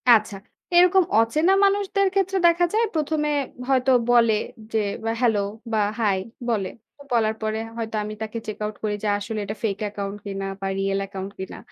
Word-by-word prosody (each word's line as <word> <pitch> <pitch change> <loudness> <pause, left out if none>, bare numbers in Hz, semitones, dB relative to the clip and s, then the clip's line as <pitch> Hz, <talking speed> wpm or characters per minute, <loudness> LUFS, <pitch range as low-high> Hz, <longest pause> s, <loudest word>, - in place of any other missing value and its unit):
আচ্ছা। 215 -2 -1 0.4
এরকম 360 +2 +6 0.2
অচেনা 300 +11 +3
মানুষদের 395 0 +2
ক্ষেত্রে 390 0 +1
দেখা 340 +1 +4
যায় 450 +2 +3
১ম 310 -1 0
এ - - +1 0.4
হয়তো 260 -1 +3 0.2
বলে 230 -2 +5 0.4
যে 225 - +1 0.3
এ - - +2
Hello 225 -4 +3 0.3
বা 220 - +2 0.2
Hi 205 -4 +2 0.3
বলে। 200 -5 0 0.3
তো - - -16
বলার 220 -2 +2
পরে 215 0 -1 0.2
হয়তো 225 -1 -4
আমি 210 +1 -5
তাকে 220 +1 -4
check 215 - -5
out 210 0 -4
করি 210 -1 0
যে - - 0
আসলে 215 +1 -4
এটা 210 +2 -4
fake 205 -2 -1
account 200 -1 -5
কিনা 195 -1 -4 0.2
বা 195 - -2
real 195 0 0
account 190 0 -6
কিনা। 190 - -6
220 Hz, 185 wpm, -24 LUFS, 205-310 Hz, 0.4 s, এরকম